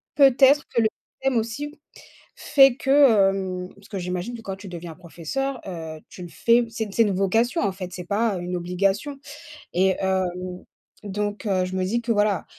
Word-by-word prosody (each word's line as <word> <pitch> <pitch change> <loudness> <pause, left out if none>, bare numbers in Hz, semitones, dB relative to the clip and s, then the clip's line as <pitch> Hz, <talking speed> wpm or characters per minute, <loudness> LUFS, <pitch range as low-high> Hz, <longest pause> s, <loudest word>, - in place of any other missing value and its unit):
peut-être, 275 +1 +6
que 235 - +1
le - - +4 0.3
système 270 -3 +1
aussi 285 +7 -4 0.6
fait 270 -4 +5
que, 270 - -5 0.4
hem 185 -2 -4
parce 200 0 -18
que 200 - -5
j'imagine 180 +6 -4
que 230 - -9
quand 195 -3 -5
tu 200 - -11
deviens 170 -2 -7
professeur, 190 - -4
heu, 160 -4 -6
tu 180 - -11
le - - -7
fais, 235 +6 +3
c'est 225 0 -3
une 205 - -9
c'est 230 - +4
une 205 -3 0
vocation 225 - +1
en 200 - +1
fait, 185 -1 -7
c'est 180 - -6
pas 205 +2 0
une 180 +1 -4
obligation 195 +10 -1 0.5
et 190 +1 +2
hem, 185 -1 -2 0.4
donc 205 +1 -3
heu, 185 -2 +1
je 185 +1 -5
me 185 - 0
dis 235 +5 0
que, 230 0 -2
voilà, 205 -3 +1
195 Hz, 190 wpm, -24 LUFS, 180-235 Hz, 0.6 s, peut-être